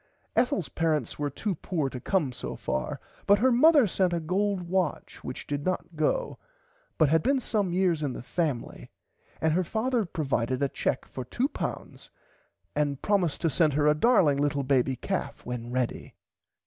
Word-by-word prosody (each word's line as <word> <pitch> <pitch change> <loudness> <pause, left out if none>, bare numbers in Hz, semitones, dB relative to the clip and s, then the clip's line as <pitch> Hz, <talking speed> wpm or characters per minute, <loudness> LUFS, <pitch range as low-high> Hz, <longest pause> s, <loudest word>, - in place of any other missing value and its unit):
Ethels 225 - +1
parents 155 -7 -1
were 145 -1 0
too 195 - -2
poor 160 -3 -2
to 130 -1 -6
come 155 -1 0
so 125 - -6
far 65 - -3 0.3
but 200 - +6
her 255 +5 +3
Mother 290 +2 +6
sent 185 -2 +1
her - - +1
a - - -1
gold 190 +3 0
watch 180 -1 -2
which - - -6
did 145 0 -3
not 180 -1 -2
go 485 - 0 0.6
but 155 -3 +4
had 160 +1 +4
been 270 - +2
some 210 -6 0
years 175 -3 +2
in 140 -4 -1
the - - -7
family 145 -4 -3 0.5
and 160 -1 +2
her 185 +3 +2
father 230 +5 0
provided 135 -6 -1
a 140 - +2
cheque 130 - -1
for 130 - -6
£2 245 - -4 0.7
and 145 -2 0
promised 190 -7 +1
to 165 - +2
send 155 -3 +3
her 145 +1 +2
a 150 - +6
darling 155 - +4
little 145 -1 +1
baby 130 -1 +2
calf - - -4
when 120 -1 -5
ready. 125 -1 -2
160 Hz, 175 wpm, -28 LUFS, 140-195 Hz, 0.7 s, but